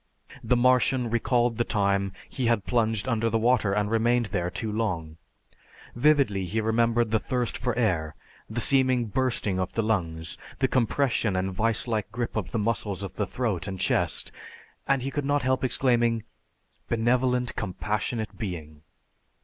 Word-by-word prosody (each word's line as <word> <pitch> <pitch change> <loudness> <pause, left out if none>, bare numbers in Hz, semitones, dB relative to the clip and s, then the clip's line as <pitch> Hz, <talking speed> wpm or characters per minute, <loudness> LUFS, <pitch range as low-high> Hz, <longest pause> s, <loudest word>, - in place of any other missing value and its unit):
The 125 - +2
Martian 125 -1 +3
recalled 120 0 +1
the 120 - +2
time 100 -3 +1 0.2
he 125 -3 -2
had 115 -4 +1
plunged 115 -2 0
under 115 -2 +1
the 115 - +1
water 115 -3 +2
and 105 +1 0
remained 120 +2 +2
there 85 0 0
too 110 +4 -4
long; 85 -8 -2 0.8
vividly, 120 -7 +3
he 105 +5 -2
remembered 115 +1 +2
the 110 - +3
thirst 125 +1 -2
for 125 - -2
air, 85 -10 0 0.3
the 115 +2 -2
seeming 130 -2 +3
bursting 115 -5 -1
of 95 0 -2
the 115 - 0
lungs, 85 -7 -2 0.2
the - - +2
compression 120 -4 +1
and 95 +1 -1
vise 110 +2 0
like 110 -3 -2
grip 120 0 -3
of 105 -5 -2
the 115 - -2
muscles 105 -3 -1
of 95 - -6
the 105 - -2
throat 105 -7 -2
and 95 -1 -5
chest, - - 0 0.6
and 135 -2 +2
he 135 - -3
could 145 0 -2
not 145 0 +1
help 130 0 +1
exclaiming, 120 -3 +2 0.7
"Benevolent, 125 +2 +1
Compassionate 105 +3 -3
Being!" 80 -8 -6
115 Hz, 160 wpm, -26 LUFS, 100-125 Hz, 0.8 s, Martian